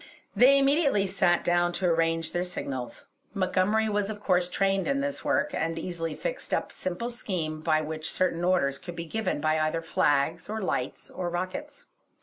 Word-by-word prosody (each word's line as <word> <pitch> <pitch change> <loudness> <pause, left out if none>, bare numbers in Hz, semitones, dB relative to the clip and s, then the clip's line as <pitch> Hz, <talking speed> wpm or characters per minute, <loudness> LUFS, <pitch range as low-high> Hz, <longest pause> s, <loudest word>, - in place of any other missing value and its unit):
They 270 +3 +7
immediately 275 -6 +3
sat 180 -2 +2
down 175 0 +2
to 185 - -2
arrange 165 -1 +1
their 175 - 0
signals. 135 -8 -5 0.3
Montgomery 195 +3 +2
was 205 -1 0
of 210 -1 -5
course 180 -3 +2
trained 195 +1 +1
in 275 0 +1
this 280 0 -2
work, 290 0 +1
and 165 -6 -1
easily 165 -2 -4
fixed - - -3
up - - -3
a - - -9
simple 185 +7 -3
scheme 170 -9 -3
by 155 -1 +2
which 155 +1 -4
certain 175 -2 0
orders 175 -7 +2
could 175 -2 -8
be 170 0 -5
given 220 0 -2
by 155 +1 +1
either 155 +1 0
flags, 150 +3 +1
or 220 +1 -2
lights, 190 - -3
or 175 -1 -3
rockets. 180 +2 -5
180 Hz, 180 wpm, -27 LUFS, 165-210 Hz, 0.3 s, They